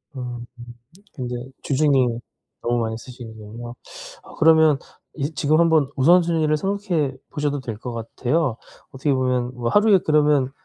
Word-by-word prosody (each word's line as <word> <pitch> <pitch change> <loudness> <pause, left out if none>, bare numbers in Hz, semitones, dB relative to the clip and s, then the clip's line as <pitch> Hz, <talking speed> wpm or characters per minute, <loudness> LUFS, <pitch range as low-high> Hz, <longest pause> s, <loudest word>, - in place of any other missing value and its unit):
음. 120 -2 -6 0.7
근데 125 -4 -5 0.3
주중에 145 +2 +1 0.7
너무 120 0 0
많이 110 0 -2
쓰시는 115 -2 -11
거군요. 120 +3 -9 0.5
아 - - -14
그러면 160 -2 +5 0.4
이 150 +1 -3
지금 155 +1 +2
한번 160 -4 +3
우선순위를 165 +1 +3
생각해 180 -7 -1 0.2
보셔도 145 -1 -1
될 115 -4 -6
것 120 +1 -6
같아요. 120 +3 -1 0.3
어떻게 135 +1 0
보면 125 -1 0
뭐 120 -1 -2
하루에 205 -2 +5
그러면 150 -3 +3
140 Hz, 300 characters per minute, -22 LUFS, 120-155 Hz, 0.7 s, 그러면